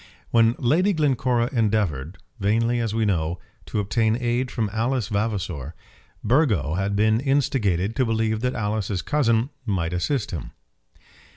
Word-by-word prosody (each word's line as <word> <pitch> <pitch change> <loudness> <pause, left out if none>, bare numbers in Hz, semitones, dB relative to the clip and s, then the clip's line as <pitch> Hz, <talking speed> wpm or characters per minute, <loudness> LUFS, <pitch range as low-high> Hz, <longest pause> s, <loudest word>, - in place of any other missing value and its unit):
When 115 0 +4
Lady 165 +11 +2
Glencora 130 -6 +1
endeavoured, 100 - 0 0.2
vainly 115 +4 +1
as 115 -2 -1
we 115 -1 +1
know, 85 -4 0 0.3
to - - -4
obtain 110 +2 +1
aid 120 +1 0
from 115 -5 -1
Alice 115 0 0
Vavasor, 95 - -2 0.5
Burgo 105 - +2
had 95 +3 -1
been 110 +2 +3
instigated 115 -8 +1
to 130 - +3
believe 110 -1 0
that 125 +1 -1
Alice's 105 -3 -2
cousin 125 -3 +1 0.2
might 90 -5 -1
assist 110 +7 -1
him. 80 -9 -6
110 Hz, 135 wpm, -24 LUFS, 100-120 Hz, 0.5 s, When